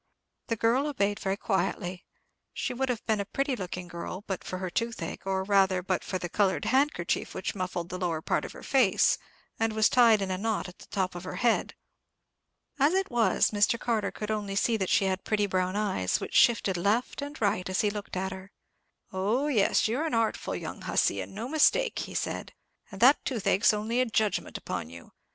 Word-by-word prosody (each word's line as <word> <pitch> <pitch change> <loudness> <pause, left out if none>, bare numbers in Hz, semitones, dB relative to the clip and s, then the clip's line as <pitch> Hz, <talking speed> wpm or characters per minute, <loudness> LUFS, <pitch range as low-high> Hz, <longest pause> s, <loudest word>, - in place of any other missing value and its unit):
The 230 - 0
girl 235 +6 +2
obeyed 205 -7 0
very 195 0 -1
quietly. 190 -2 -2 0.5
She - - -2
would 265 +1 -1
have 240 -2 -2
been 220 -2 +1
a 200 - -2
pretty 275 +5 -1
looking 180 -3 -6
girl 175 +3 -6
but 190 -2 -4
for 185 - -5
her 185 -1 -4
toothache, 225 -6 -3
or 190 0 0
rather, 190 -2 +3
but 185 0 -1
for 185 - -3
the 175 - -4
coloured 190 -4 +1
handkerchief 260 - 0
which 190 - -3
muffled 180 -3 -4
the 185 - -5
lower 170 -3 -1
part - - -1
of - - -7
her - - -12
face, 250 -9 +3 0.4
and 225 -1 +1
was 215 0 +4
tied 230 -4 +5
in 190 - -3
a 185 - -2
knot 220 -2 -1
at 180 - -13
the - - -14
top 190 -2 -1
of 175 0 -7
her 185 - -6
head. 240 -2 +1 1.0
As 290 +6 +4
it 385 -4 0
was, 235 -2 +3
Mr. 210 +2 +2
Carter 225 -3 0
could 210 0 -5
only 205 -2 -2
see 230 +3 +2
that 190 -4 -1
she 195 - +3
had 190 0 -1
pretty 210 -1 +1
brown 185 -1 -1
eyes, 195 - 0
which - - -6
shifted 205 -6 +4
left 210 +10 0
and 290 +1 -6
right 200 -3 0
as 185 - +1
he 210 -2 +1
looked 205 -2 -6
at 190 +1 -2
her. 190 +1 -9 0.6
"Oh, 220 +10 0
yes, 220 -6 +3
you're 265 +9 -1
an 250 - -1
artful 225 -1 0
young - - -6
hussy, - - +1
and - - -8
no 225 +4 -4
mistake," 380 - +3
he - - -6
said; - - -3 0.4
"and 195 - -9
that 265 +4 +6
toothache's 215 -5 +2
only 220 +4 0
a 255 - +1
judgment 215 -2 0
upon 80 - -5
you. 85 0 -12
205 Hz, 210 wpm, -28 LUFS, 185-230 Hz, 1.0 s, that